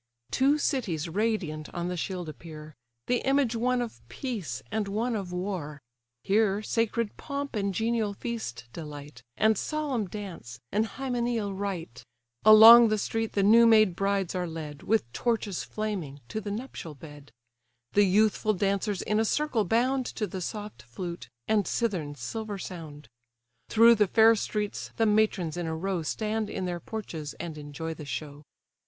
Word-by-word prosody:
Two 275 +3 +3
cities 215 - -1
radiant 175 -5 -2
on 175 0 -2
the 180 - -2
shield 180 0 -4
appear, 155 0 -10 0.3
The 245 - +2
image 270 -3 +1
one 245 +2 +1
of 235 - -8
peace, 200 - -4
and 220 -2 -1
one 225 +4 -1
of 195 -4 -4
war. 180 -5 -4 0.4
Here 205 0 +2
sacred 230 0 -1
pomp 280 -2 -5
and 200 -2 0
genial 220 +1 0
feast 195 - -5
delight, 145 -4 -9 0.2
And 220 0 +4
solemn 285 -9 -2
dance, 175 - -8
and 215 +2 +1
hymeneal 240 -5 -2
rite; 190 - -5 0.4
Along 225 +2 +10
the 215 0 +1
street 225 +2 -2
the 200 - +2
new 230 +3 +7
made 215 -5 +5
brides 195 -1 0
are 180 -1 -2
led, 155 -3 -7
With 215 - 0
torches 225 -6 -1
flaming, 185 -10 -4
to 220 - -3
the 205 - -5
nuptial 205 - -6
bed: 145 0 -13 0.6
The 205 - +5
youthful 215 +2 +3
dancers 200 +1 0
in 210 0 +1
a - - +3
circle 250 -2 +1
bound 250 +5 +1
To 215 - -3
the 190 -2 -6
soft 210 - -6
flute, 170 +10 -7 0.2
and 210 -3 +2
cithern's 165 - -2
silver 215 - -4
sound: 155 -7 -8 0.6
Through 230 +1 +7
the 210 -2 +3
fair 225 +3 +6
streets 210 -1 -3
the 225 - +3
matrons 210 -6 +2
in 175 -2 -2
a 160 - -2
row 190 0 -1
Stand 215 +6 -2
in 185 - -3
their 175 -1 -3
porches, 170 -7 -6
and 170 -2 -6
enjoy 150 +2 -6
the 155 -1 -9
show. 145 0 -6
205 Hz, 160 wpm, -28 LUFS, 165-225 Hz, 0.6 s, Along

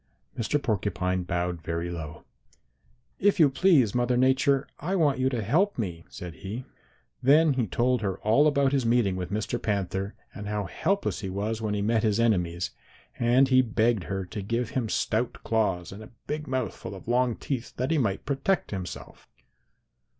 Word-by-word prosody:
"Mr. 125 +6 0
Porcupine 95 -5 -1
bowed 90 -1 -2
very 85 +1 -3
low. 80 -3 -7 1.0
'If 200 -1 +3
you 150 -4 +6
please, 140 - +4
Mother 120 0 +1
Nature, 130 +2 +3
I 180 +7 -2
want 145 -7 +2
you 130 0 +2
to 120 -4 -2
help 175 - +2
me,' 85 -7 -4
said 90 -2 -8
he. 110 +6 -6 0.6
"Then 150 +3 +5
he 125 -4 0
told 120 +6 +1
her 95 -3 -2
all 115 +8 +4
about 140 -2 +3
his 135 -2 +1
meeting 115 -5 +2
with 90 -1 -4
Mr. 105 +1 -2
Panther 100 -1 -2 0.2
and 105 0 -7
how 105 0 -1
helpless 195 - -1
he 95 - -4
was 105 +4 -2
when 105 -2 -1
he 100 - -1
met 110 +1 +2
his 110 -1 +1
enemies, 90 -6 +1 0.5
and 125 +3 +4
he 130 -1 +6
begged 115 -4 +1
her 95 -1 -3
to 100 +3 -6
give 115 +3 -2
him 120 -4 -1
stout 115 +4 0
claws 100 -6 0
and 100 +3 -9
a 110 - -11 0.2
big 150 +1 -4
mouth 130 -5 -2
full - - -8
of 95 - -12
long 120 0 +2
teeth 130 -4 -4
that 130 +5 -1
he 160 - +3
might 100 -7 -1
protect 140 +7 0
himself. 95 -3 -7
115 Hz, 180 wpm, -27 LUFS, 95-130 Hz, 1.0 s, you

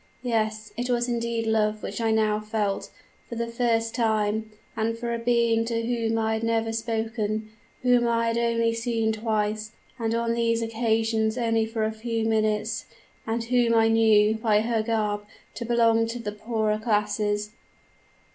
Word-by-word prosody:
Yes, 215 -3 -1
it 245 +1 -2
was 240 0 +1
indeed 235 -1 -1
love 215 -1 +1
which - - -4
I 225 - +1
now 215 -1 +2
felt, 215 -2 -2 0.4
for 235 - -5
the 235 0 -1
first 230 -1 0
time, 220 -2 0 0.3
and 230 +1 -1
for 235 0 -3
a 235 - -2
being 230 -1 +2
to 230 0 -2
whom 230 -2 0
I 220 0 +1
had 220 - -1
never 225 0 0
spoken 220 -1 -2 0.3
whom 245 -1 +4
I 230 0 +1
had 230 - -1
only 230 -1 +1
seen 230 -1 0
twice, 215 -1 -2 0.3
and 225 0 0
on 230 0 0
these 230 0 +1
occasions 225 0 0
only 225 -2 +1
for 225 -1 -2
a 215 - 0
few 225 0 -3
minutes, 215 0 0 0.4
and 230 +1 -1
whom 235 -1 +2
I 225 0 +4
knew, 220 -1 +5
by 220 -1 +2
her 225 0 0
garb, 210 -2 -1 0.3
to 235 - -5
belong 230 -1 +3
to 230 +2 -4
the 210 -3 -4
poorer 215 0 -1
class. 210 -1 0
225 Hz, 165 wpm, -26 LUFS, 215-230 Hz, 0.4 s, knew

